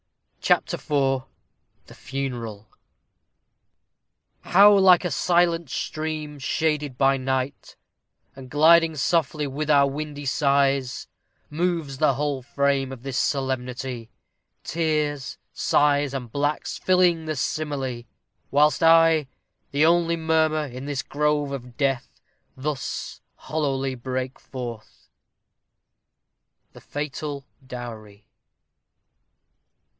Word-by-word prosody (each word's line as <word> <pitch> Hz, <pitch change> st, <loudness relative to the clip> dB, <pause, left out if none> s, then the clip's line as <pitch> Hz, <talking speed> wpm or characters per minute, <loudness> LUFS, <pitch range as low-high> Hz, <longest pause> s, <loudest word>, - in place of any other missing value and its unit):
CHAPTER -, -, +2 dB
IV 135 Hz, -3 st, 0 dB, 0.6 s
THE -, -, -14 dB
FUNERAL 120 Hz, -6 st, -5 dB, 1.7 s
How 200 Hz, +3 st, +6 dB
like 190 Hz, -2 st, +6 dB
a 175 Hz, -, -1 dB
silent 170 Hz, +1 st, +2 dB
stream, 155 Hz, +1 st, -4 dB
shaded 150 Hz, -1 st, -1 dB
by 135 Hz, 0 st, +3 dB
night, 130 Hz, +1 st, -3 dB, 0.6 s
And 135 Hz, -1 st, -11 dB
gliding 160 Hz, +2 st, +5 dB
softly 150 Hz, 0 st, 0 dB
with 145 Hz, +2 st, -4 dB
our 140 Hz, -2 st, +5 dB
windy 145 Hz, +1 st, -5 dB
sighs, 140 Hz, -2 st, +1 dB, 0.4 s
Moves 160 Hz, -4 st, -2 dB
the 150 Hz, -4 st, +3 dB
whole 145 Hz, -1 st, -2 dB
frame 140 Hz, 0 st, 0 dB
of 130 Hz, -2 st, -9 dB
this 135 Hz, -2 st, -4 dB
solemnity! 130 Hz, -3 st, -2 dB, 0.5 s
Tears, 150 Hz, -4 st, -1 dB, 0.2 s
sighs, 145 Hz, -1 st, +2 dB
and 125 Hz, -4 st, -5 dB
blacks, 145 Hz, +3 st, -2 dB
filling 180 Hz, -3 st, +3 dB
the 155 Hz, 0 st, -2 dB
simile! 135 Hz, -4 st, -3 dB, 0.5 s
Whilst 150 Hz, +3 st, +3 dB
I, 165 Hz, -2 st, +5 dB, 0.4 s
the 145 Hz, +2 st, +2 dB
only 170 Hz, 0 st, +3 dB
murmur 160 Hz, -1 st, +1 dB
in 130 Hz, 0 st, -8 dB
this 145 Hz, -3 st, -2 dB
grove 150 Hz, -1 st, 0 dB
Of 125 Hz, -3 st, -7 dB
death, 135 Hz, -3 st, -1 dB, 0.4 s
thus 140 Hz, 0 st, -4 dB
hollowly 135 Hz, -4 st, -2 dB
break 130 Hz, +1 st, -4 dB
forth. 120 Hz, -4 st, -9 dB, 1.7 s
_The -, -, -14 dB
Fatal 145 Hz, -1 st, -5 dB, 0.2 s
Dowry. 110 Hz, -5 st, -9 dB
145 Hz, 100 wpm, -24 LUFS, 130-155 Hz, 1.7 s, How